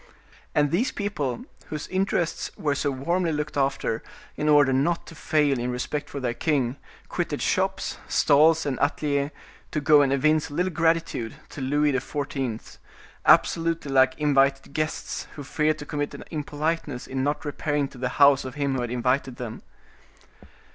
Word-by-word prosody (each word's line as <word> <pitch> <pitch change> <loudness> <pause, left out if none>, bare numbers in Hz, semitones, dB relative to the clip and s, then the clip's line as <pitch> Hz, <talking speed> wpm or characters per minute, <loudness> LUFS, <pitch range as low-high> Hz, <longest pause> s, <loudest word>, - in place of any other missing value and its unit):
And 145 -1 +3
these 220 +10 +1
people, 150 - -3 0.2
whose 150 -1 -5
interests 185 -3 -1
were 145 -2 0
so 145 +1 0
warmly 170 +6 0
looked 150 0 -3
after, 135 -5 0 0.3
in 150 - 0
order 145 -3 +5
not 155 +6 +1
to - - -11
fail 150 -4 +1
in 120 +1 -2
respect 145 +4 -3
for 140 - -5
their 125 -3 -1
king, 135 -3 0 0.3
quitted - - -2
shops, - - -1
stalls, 155 +3 +4
and 135 -3 -2
atliers, 145 -1 0 0.4
to 150 - -1
go 150 0 +6
and 135 -2 +2
evince 155 +3 +2
a 145 - -8
little 180 +3 +1
gratitude 165 -7 0
to 145 - -8
Louis 145 +2 +2
XIV., 135 -3 -3 0.5
absolutely 165 -3 +3
like 130 -1 +4
invited 140 -2 +2
guests, 155 +1 -3
who 145 - -7
feared 155 +1 0
to 145 - -8
commit 145 0 -3
an - - -8
impoliteness 150 -3 -2
in 130 0 -3
not 145 +2 -1
repairing 145 -1 -1
to 135 - -13
the 125 0 -1
house 140 -1 +6
of 130 -1 -7
him 140 -2 0
who 130 - -1
had 120 - -3
invited 125 +2 0
them. 120 -3 -6
145 Hz, 165 wpm, -25 LUFS, 135-155 Hz, 0.5 s, go